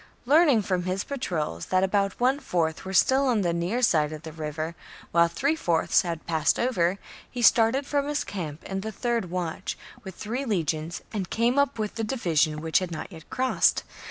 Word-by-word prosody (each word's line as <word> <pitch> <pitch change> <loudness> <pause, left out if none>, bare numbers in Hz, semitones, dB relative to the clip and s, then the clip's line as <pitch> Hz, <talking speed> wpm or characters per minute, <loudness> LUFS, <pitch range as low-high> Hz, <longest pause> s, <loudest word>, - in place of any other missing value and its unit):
Learning 285 -5 +5
from 180 -2 -1
his 185 +1 -1
patrols 165 - -3
that 185 0 +2
about 195 0 0
one 260 +3 +2
fourth 165 - -1
were 190 - -5
still 265 +8 +4
on 235 -5 +2
the 175 -3 0
near 180 +9 -1
side 155 -8 +3
of 155 0 -8
the 160 - -7
river, 155 +1 -4 0.4
while 170 0 +5
three 280 - 0
fourths 170 - +2
had 170 -4 -5
passed 160 -2 +1
over, 190 -7 +1 0.3
he 245 -2 -4
started 230 +5 +5
from 285 0 0
his 295 0 -1
camp 160 -6 -6
in 195 0 -4
the 220 +2 -4
third 235 -3 -1
watch,^ 175 -2 -3 0.3
with 190 -3 -8
three 240 +6 -3
legions, 165 - -2
and 195 -5 -3
came 240 +4 +2
up 280 -4 +1
with 215 -1 -2
the 225 - -3
division 165 - 0
which 160 0 +2
had 185 -2 -4
not 170 +4 -6
yet 160 -3 -12
crossed. 260 0 +2
190 Hz, 195 wpm, -26 LUFS, 165-240 Hz, 0.4 s, Learning